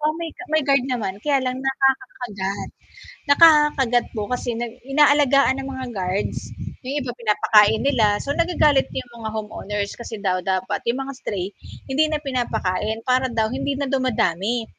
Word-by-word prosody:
Oo, 305 Hz, +1 st, +1 dB
may 335 Hz, -1 st, -4 dB
ga -, -, -11 dB
may 315 Hz, -1 st, +3 dB
guard 275 Hz, -2 st, +3 dB
naman 225 Hz, -7 st, -2 dB
kaya 285 Hz, 0 st, +2 dB
lang 255 Hz, 0 st, -2 dB
nakakakagat. 250 Hz, -7 st, -1 dB, 0.6 s
Nakakakagat 295 Hz, -6 st, +5 dB
po 210 Hz, -3 st, -3 dB
kasi 250 Hz, -1 st, -2 dB
na 240 Hz, -, -2 dB, 0.2 s
inaalagaan 280 Hz, -1 st, +4 dB
ng 270 Hz, -, -6 dB
mga 260 Hz, -1 st, -5 dB
guards, 190 Hz, +1 st, -3 dB, 0.3 s
yung 275 Hz, +3 st, -3 dB
iba 245 Hz, -, -4 dB
pinapakain 215 Hz, -2 st, +3 dB
nila 220 Hz, -7 st, +3 dB
so 280 Hz, -, -1 dB
nagagalit 305 Hz, -4 st, +2 dB
'yong 245 Hz, -2 st, -7 dB
mga 220 Hz, -, -4 dB
home 215 Hz, 0 st, -5 dB
owners 205 Hz, -1 st, -4 dB
kasi 235 Hz, -1 st, -7 dB
daw 185 Hz, -2 st, 0 dB
dapat 190 Hz, +2 st, -1 dB
'yong 245 Hz, +3 st, 0 dB
mga 275 Hz, -, -5 dB
stray, 190 Hz, -7 st, -4 dB, 0.4 s
hindi 280 Hz, +3 st, +2 dB
na 305 Hz, -, 0 dB
pinapakain 220 Hz, -6 st, -2 dB
para 255 Hz, +1 st, +2 dB
daw 225 Hz, -1 st, +1 dB
hindi 275 Hz, 0 st, -2 dB
na 280 Hz, -, -1 dB
dumadami. 240 Hz, -4 st, 0 dB
250 Hz, 165 wpm, -22 LUFS, 210-275 Hz, 0.6 s, Nakakakagat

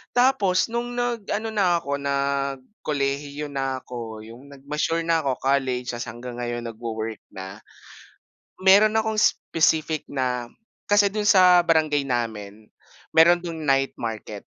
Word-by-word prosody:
tapos 240 Hz, -6 st, +3 dB
nung 240 Hz, +1 st, -3 dB
nag-ano 225 Hz, -3 st, -2 dB
na 180 Hz, -5 st, +1 dB
ako, 140 Hz, 0 st, -2 dB
nagkolehiyo 140 Hz, +1 st, -2 dB
na 135 Hz, -1 st, -3 dB
ako, 115 Hz, -3 st, -7 dB
yung 115 Hz, +5 st, -13 dB
nag-mature 150 Hz, +4 st, -2 dB
na 165 Hz, 0 st, +2 dB
ako, 135 Hz, -4 st, -1 dB
college 130 Hz, -2 st, 0 dB
tapos 120 Hz, 0 st, -5 dB
hanggang 120 Hz, +2 st, -8 dB
ngayon 120 Hz, 0 st, -3 dB
nagwo-work 110 Hz, -1 st, -5 dB, 0.2 s
na, 95 Hz, +2 st, -8 dB, 1.0 s
meron 205 Hz, +3 st, +5 dB
akong 220 Hz, -1 st, 0 dB
specific 155 Hz, -1 st, +1 dB
na 125 Hz, -3 st, -2 dB, 0.4 s
kasi 205 Hz, 0 st, +5 dB
dun 210 Hz, +1 st, -1 dB
sa 180 Hz, -2 st, +7 dB
barangay 155 Hz, -3 st, +2 dB
namin, 110 Hz, -5 st, -4 dB, 0.5 s
meron 170 Hz, +2 st, +6 dB
dun 165 Hz, -2 st, -5 dB
night 135 Hz, 0 st, +2 dB
market, 110 Hz, -3 st, -6 dB
140 Hz, 130 wpm, -24 LUFS, 125-180 Hz, 1.0 s, sa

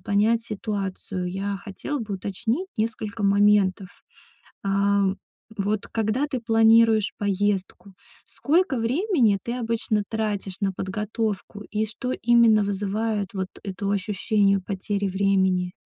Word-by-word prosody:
понять 220 Hz, +3 st, +2 dB
ситуацию, 195 Hz, -3 st, -4 dB
я 195 Hz, +1 st, -2 dB
хотела 205 Hz, +9 st, -5 dB
бы 215 Hz, -3 st, -4 dB
уточнить 220 Hz, -, -2 dB
несколько 220 Hz, 0 st, -3 dB
моментов. 200 Hz, -1 st, +3 dB, 0.8 s
А, 200 Hz, 0 st, +2 dB, 0.5 s
вот 205 Hz, +1 st, -1 dB
когда 225 Hz, +5 st, 0 dB
ты 260 Hz, -4 st, -3 dB
планируешь 225 Hz, -1 st, +4 dB
поездку, 200 Hz, -1 st, -1 dB, 0.3 s
сколько 310 Hz, -4 st, +1 dB
времени 250 Hz, -, +2 dB
ты 235 Hz, -, -4 dB
обычно 230 Hz, -3 st, -1 dB
тратишь 205 Hz, -4 st, -2 dB
на 195 Hz, -2 st, 0 dB
подготовку 210 Hz, +2 st, -3 dB
и 215 Hz, 0 st, 0 dB
что 250 Hz, +4 st, -4 dB
именно 230 Hz, -3 st, +4 dB
вызывает 205 Hz, +1 st, -2 dB
вот 190 Hz, -1 st, -2 dB
это 200 Hz, 0 st, -4 dB
ощущению 200 Hz, 0 st, +1 dB
потери 200 Hz, +1 st, -2 dB
времени? 190 Hz, -2 st, +1 dB
205 Hz, 115 wpm, -24 LUFS, 195-225 Hz, 0.8 s, планируешь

